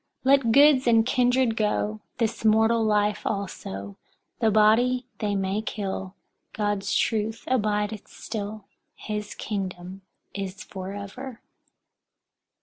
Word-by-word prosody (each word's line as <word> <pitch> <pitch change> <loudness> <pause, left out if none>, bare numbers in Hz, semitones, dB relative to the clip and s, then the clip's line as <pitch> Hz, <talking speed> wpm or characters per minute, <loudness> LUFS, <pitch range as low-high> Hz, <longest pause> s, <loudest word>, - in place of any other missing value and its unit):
Let 265 -3 +4
goods 280 0 +6
and 225 -1 +5
kindred 250 -1 +2
go, 105 - 0 0.2
this 230 -2 -1
mortal 225 +1 +4
life 210 -1 +2
also; 100 - -4 0.4
the 225 -2 +3
body 230 +4 +4
they 205 -2 -1
may 195 +2 -1
kill; 195 -3 -4 0.4
God's 205 -2 -1
truth 220 0 0
abideth 210 -3 0
still; 210 -1 -6 0.3
his 210 -1 -5
kingdom 190 -2 -5 0.3
is 195 -1 -5
forever. 200 +6 -7
210 Hz, 105 wpm, -26 LUFS, 200-230 Hz, 0.4 s, goods